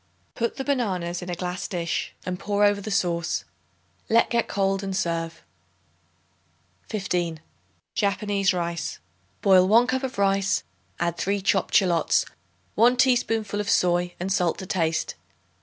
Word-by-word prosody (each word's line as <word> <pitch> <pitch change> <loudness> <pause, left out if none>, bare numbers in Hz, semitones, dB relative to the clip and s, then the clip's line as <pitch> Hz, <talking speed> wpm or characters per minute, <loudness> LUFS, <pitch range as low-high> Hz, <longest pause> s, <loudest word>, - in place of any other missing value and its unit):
Put 235 -1 -2
the 270 - -2
bananas 190 -11 -1
in 180 - -7
a 175 - -2
glass 180 +1 -4
dish 170 -3 -2
and 180 -1 -3
pour 205 +1 0
over 205 0 +3
the 215 - -6
sauce. 175 -4 0 0.7
Let 230 +1 +4
get 235 -1 +1
cold 195 -1 0
and 195 -1 -3
serve. 165 -2 -2 1.5
15. 175 -6 -2 0.5
Japanese 200 -1 +1
Rice. 170 -2 -3 0.5
Boil 185 -3 +6
1 230 +4 +6
cup 260 +1 -1
of 265 -4 -4
rice; 195 -1 +2 0.4
add 170 0 -1
3 200 +3 0
chopped 195 -1 +1
shallots, 175 -4 +3 0.5
1 245 +2 +4
teaspoonful 225 -5 +2
of 205 - -4
soy 175 0 +2
and 185 +2 -1
salt 180 -3 +1
to 190 - -6
taste. 165 -3 -1
195 Hz, 140 wpm, -25 LUFS, 175-205 Hz, 1.5 s, Boil